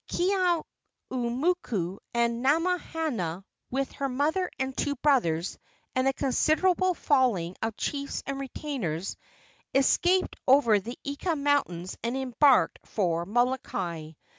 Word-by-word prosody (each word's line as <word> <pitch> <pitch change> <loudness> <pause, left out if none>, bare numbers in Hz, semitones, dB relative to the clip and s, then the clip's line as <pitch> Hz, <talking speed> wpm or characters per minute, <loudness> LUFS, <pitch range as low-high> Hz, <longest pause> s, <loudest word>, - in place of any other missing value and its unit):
Keeaumoku 305 - -1 0.2
and 235 0 +1
Namahana, 300 - 0 0.3
with 270 +1 -1
her 275 -1 -3
mother 310 +8 0
and 265 0 -2
two 285 -1 -1
brothers, 230 - +1 0.3
and 255 0 +1
a 270 - +3
considerable 350 +7 +2
following 230 - +1
of 225 -1 -2
chiefs 280 -1 -3
and 275 0 -4
retainers, 245 - -4 0.6
escaped 355 +7 +3
over 255 -6 +5
the 235 +6 -7
Eka 300 +4 -2
mountains 235 -12 0
and 235 +3 -2
embarked 265 +1 +3
for 170 -4 -1
Molokai. 195 -9 -1
265 Hz, 110 wpm, -28 LUFS, 215-295 Hz, 0.6 s, over